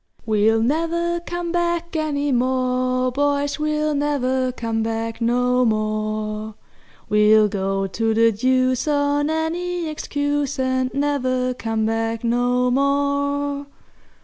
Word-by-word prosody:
"We'll 220 +1 +2
never 335 +5 0
come 345 0 -4
back 340 -1 -1
any 290 -2 -1
more, 255 0 +1
boys, 285 +2 0
We'll 305 0 0
never 260 -3 0
come 230 -2 -3
back 225 +1 -3
no 250 +2 +2
more; 215 -1 -2 0.5
We'll 210 0 +5
go 195 -1 -1
to 225 +4 -1
the 230 +1 +4
deuce 255 +4 +1
on 290 0 +1
any 335 +2 -2
excuse, 290 -1 -2
And 260 -1 0
never 255 -3 0
come 225 -3 -2
back 225 +1 -1
no 245 +1 +1
more! 280 +1 0
255 Hz, 115 wpm, -21 LUFS, 225-290 Hz, 0.5 s, We'll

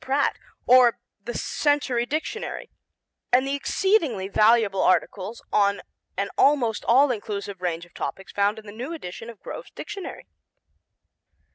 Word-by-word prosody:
Pratt 275 +2 +1 0.3
or 245 -2 +6 0.3
the 240 - -4
Century 280 -5 0
Dictionary, 315 - -4 0.6
and 255 +2 +4
the 275 - -1
exceedingly 280 - +1
valuable 215 -1 +3
articles 195 +3 0
on 200 -1 +2 0.3
an 200 +1 -1
almost 255 -6 +3
all 265 +3 +5
inclusive 200 -4 -5
range 175 -1 -2
of 175 - -24
topics 195 - -5
found 205 +2 +1
in 220 - -11
the 205 - -9
new 250 +9 -6
edition 225 - -7
of 230 -4 -11
Grove's - - -8
Dictionary. 395 -3 -7
235 Hz, 135 wpm, -25 LUFS, 200-275 Hz, 0.6 s, or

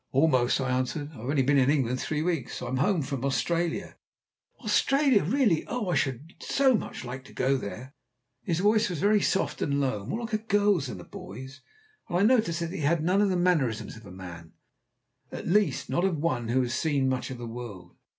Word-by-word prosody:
"Almost," 130 -3 +3
I 130 -1 -1
answered. 135 +4 -2
"I've 135 - -12
only 140 -2 +2
been 140 +2 +3
in 130 0 +3
England 130 -4 +1
three 155 0 -2
weeks. 165 -7 -2
I'm 130 - -3
home 155 +4 +2
from 135 -1 -4
Australia." 165 +5 -1 0.6
"Australia! 260 +2 +3
Really! 210 - +2
Oh, 235 -6 -2
I 175 - +1
should 140 +4 -2
so 270 -1 +3
much 215 - -3
like 130 +2 -6
to - - -14
go 135 +1 +1
out 135 - -1
there." 125 +7 -7 0.5
His 170 -2 -1
voice 215 +1 +3
was 175 - -3
very 210 +3 +3
soft 190 - 0
and 140 -1 +1
low, 130 -7 -1
more 225 - -3
like 230 -1 -6
a 215 - +2
girl's 205 -7 +2
than 100 - -6
a - - -9
boy's, 130 +10 -10 0.5
and 175 - 0
I 190 - +3
noticed 215 -8 +3
that 170 0 -2
he - - -4
had 155 +2 +2
none 185 +4 +3
of 205 - +3
the 185 - +1
mannerisms 135 - +1
of 110 -2 -13
a - - -11
man 90 -3 -10 0.8
at - - -6
least, 205 +3 +2
not 175 - 0
of 190 -4 +1
one 130 -7 -1
who 130 +3 +2
has 120 -1 -3
seen 140 -1 +1
much 130 -1 -1
of 130 - -6
the 120 - -7
world. 115 -7 -8
145 Hz, 215 wpm, -27 LUFS, 130-190 Hz, 0.8 s, Almost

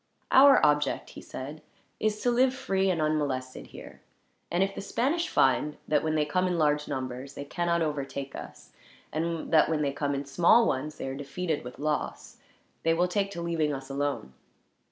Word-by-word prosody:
"Our 275 +1 +8
object," 150 -2 +1
he - - -10
said, 145 +4 -8 0.4
"is 215 0 0
to 245 - +3
live 255 +2 +3
free 195 -6 0
and 175 -3 0
unmolested 145 -4 -1
here; - - -12 0.5
and 175 +2 +2
if 195 0 -2
the - - -6
Spanish 275 - 0
find 150 +3 +2
that, 150 -1 +2
when 155 0 0
they 150 -1 +2
come 185 +5 +1
in 180 -1 0
large 150 -1 +2
numbers, 130 +1 -5
they 140 - -6
cannot 170 +2 0
overtake 140 -2 -4
us; 65 -4 -10 0.4
and 165 +1 -2
that, 155 -1 +6
when 155 -2 0
they 140 -1 0
come 145 0 -1
in 140 +1 -3
small 175 +11 +5
ones, 150 0 -2
they - - -5
are 135 - -3
defeated 145 +3 -3
with 125 0 -9
loss; 150 +1 -3 0.4
they 165 0 +2
will 175 +2 +2
take 195 +2 0
to 170 - -5
leaving 165 -3 0
us 135 0 -6
alone." 140 - -2
155 Hz, 190 wpm, -28 LUFS, 140-180 Hz, 0.5 s, Our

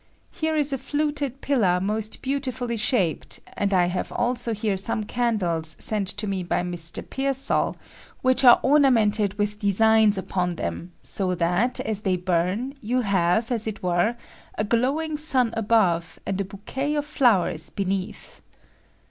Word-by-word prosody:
Here 315 -2 -2
is 295 -2 +2
a 270 - -2
fluted 290 -2 -2
pillar 205 -11 +2
most 215 +3 -3
beautiftilly 255 -4 -2
shaped; 210 - 0
and 200 -1 -1
I 180 -2 +4
have 180 +1 -3
also 240 -1 -1
here 210 -2 -1
some 215 +3 -1
candles 180 -9 -1
sent 205 -2 -2
me 195 -2 -2
by 175 0 -1
Mr, 175 -2 -5
Pearaall, 270 0 0 0.5
which 255 +1 +3
are 245 -2 +8
omamenttid 220 -8 +3
with 210 0 -2
designs 220 0 +4
upon 180 -2 -2
them, 125 - -5
so 185 -2 -1
that, 180 +8 +1
as 215 -2 -2
they 190 -3 +1
bum, 185 +8 -1
you 245 +4 0
have, 195 +2 +1
as 225 -2 -1
it 215 -3 -5
were, 180 +6 +1 0.4
a - - +1
glowing 275 +8 0
sun 260 -6 +2
above, 205 -7 +1
and 195 0 -2
a - - -2
bouquet 250 +10 -4
of 295 -1 -1
flowers 215 - +2
beneath. 195 -1 -4
215 Hz, 150 wpm, -24 LUFS, 185-255 Hz, 0.5 s, are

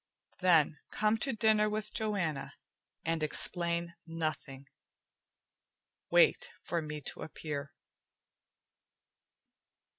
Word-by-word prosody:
"Then 165 -5 +4
come 215 +1 +1
to 270 - +3
dinner 215 -2 +3
with 210 0 -3
Joanna 185 -10 -2 0.5
and 165 -1 0
explain 170 +2 +1
nothing. 155 -4 -4 1.4
Wait - - +4
for 170 0 -1
me 150 -1 -6
to - - -6
appear." 145 -3 -5
170 Hz, 85 wpm, -32 LUFS, 155-210 Hz, 1.4 s, Then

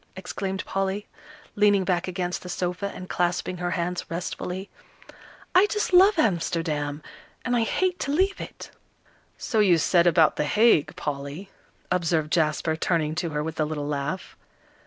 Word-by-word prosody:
exclaimed 190 0 -4
Polly, 195 +1 -2 0.5
leaning 205 -2 +4
back 175 -1 0
against 180 -1 -3
the 180 - -9
sofa, 180 +3 -2
and 185 - -8
clasping 180 +1 -1
her 175 0 -2
hands 175 0 -2
restfully. 180 +2 -4 0.9
"I 375 +3 +6
just 420 -2 -2
love 380 +2 +7
Amsterdam! 160 - 0 0.4
And 245 -1 +1
I 235 - +3
hate 360 +10 0
to 280 - -2
leave 380 +6 +1
it!" - - -9 0.7
"So 220 - -1
you 190 -5 +5
said 170 +2 +3
about 165 -2 +4
The 150 - +1
Hague, 210 -1 +3
Polly," 145 +6 -5 0.4
observed 165 -4 +1
Jasper, 155 -1 +1
turning 160 -2 0
to 170 +1 -2
her 150 -1 -2
with 160 0 -5
a - - +3
little 150 -1 -4
laugh. 145 +5 -3
180 Hz, 155 wpm, -25 LUFS, 160-200 Hz, 0.9 s, love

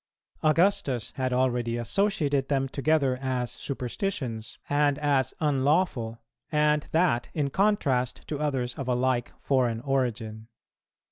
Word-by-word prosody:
"[216:1] 155 - +5
Augustus 155 - +2
had 130 -1 0
already 125 -2 +1
associated 145 - +1
them 135 -2 +1
together 140 -1 +1
as 125 -2 -1
superstitions, 125 - -4
and 145 -1 +2
as 140 -4 +1
unlawful, 140 -5 +1 0.3
and 150 -1 +2
that 160 -8 +2
in 145 -3 0
contrast 140 - +1
to 150 - -3
others 135 -5 -1
of 135 - -4
a 125 - +2
like 125 -1 0
foreign 125 -4 +1
origin. 115 -5 -2
135 Hz, 125 wpm, -27 LUFS, 125-150 Hz, 0.3 s, 216:1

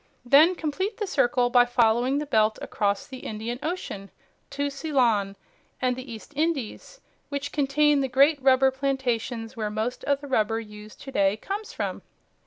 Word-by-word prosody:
Then 305 +8 +6
complete 375 +7 -3
the 425 - -2
circle 245 -9 +1
by 245 -1 +6
following 245 +2 +2
the 300 - -2
belt 215 -5 +2
across 200 -1 -1
the 260 0 -9
Indian 225 +2 -5
Ocean 295 - -5 0.4
to 285 0 -2
Ceylon 245 -9 +1 0.4
and 255 -1 +1
the 255 0 -8
East 225 +6 -10
Indies 315 - -3 0.3
which 285 0 -4
contain 295 0 +2
the 270 - 0
great 280 +3 +4
rubber 265 0 +4
plantations 255 -3 -2
where 215 -2 -2
most 220 +4 -3
of 280 -1 +1
the 285 - -9
rubber 225 -4 +1
used 210 -1 -11
to 270 - -8
day 200 -3 +2
comes 405 - -5
from. - - -4
260 Hz, 165 wpm, -25 LUFS, 225-285 Hz, 0.4 s, Then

